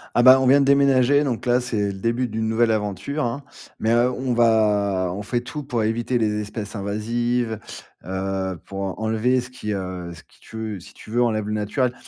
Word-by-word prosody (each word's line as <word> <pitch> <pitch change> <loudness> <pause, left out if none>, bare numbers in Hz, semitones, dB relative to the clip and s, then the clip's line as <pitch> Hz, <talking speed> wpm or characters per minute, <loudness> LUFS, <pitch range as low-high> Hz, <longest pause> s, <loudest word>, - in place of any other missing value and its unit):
Ah, 120 - +4
bah, 130 +1 +8
on - - +2
vient 140 +2 +6
de 140 - +3
déménager, 140 0 +4
donc 125 -5 -2
là 125 0 +3
c'est 110 -5 -1
le 100 - -3
début 115 +6 -1
d'une 110 0 -3
nouvelle 115 0 +3
aventure, 105 - -2
hein. 120 +4 -3 0.4
Mais, 110 - +1
heu, 120 +2 +3
on 125 0 -2
va 105 -5 +2
on 100 - -5
fait 120 +4 -1
tout 150 +5 -7
pour 125 -5 -1
éviter 115 +3 0
les 105 -2 0
espèces 105 +1 -6
invasives, 110 +3 -1 0.5
heu, 95 -1 -3
pour 100 0 -6
en 95 +1 -4
enlever 115 +4 +2
ce 125 0 -7
qui, 125 -4 -6
heu, 90 -3 -5
ce 85 - -12
qui - - -27
tu 110 - -11
veux 110 -3 -4
si 100 - -14
tu 110 - -13
veux, 120 +1 +3
enlève 110 -3 0
le 105 - -2
naturel. 120 +4 0
110 Hz, 220 wpm, -23 LUFS, 105-125 Hz, 0.5 s, bah